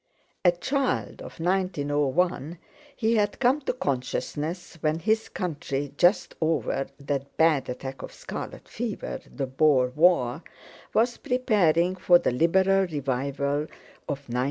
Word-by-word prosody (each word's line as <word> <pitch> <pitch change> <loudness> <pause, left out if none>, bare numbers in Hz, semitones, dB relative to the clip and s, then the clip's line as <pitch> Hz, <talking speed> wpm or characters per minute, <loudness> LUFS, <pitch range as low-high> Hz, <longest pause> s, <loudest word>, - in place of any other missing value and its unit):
A 175 - +6
child 270 - -1
of - - -10
1901, 165 -2 0 0.4
he 225 -2 +1
had 205 -1 +1
come 265 +3 +3
to 265 - -1
consciousness 150 - -3
when 155 0 +1
his 220 +6 0
country, 145 -5 -3
just 175 +6 +3
over 155 -4 0
that 140 -1 -4
bad 155 -5 +3
attack 130 +1 -6
of - - -7
scarlet - - -7
fever, 225 -2 -4
the 140 - -3
Boer 130 -1 +3
War, 150 -3 +3 0.5
was 235 +2 +2
preparing 185 -9 +2
for 180 -1 +5
the - - 0
Liberal 190 +7 +3
revival 140 0 -1 0.4
of 145 - -1
1906. 120 0 -3
160 Hz, 130 wpm, -26 LUFS, 140-190 Hz, 0.5 s, A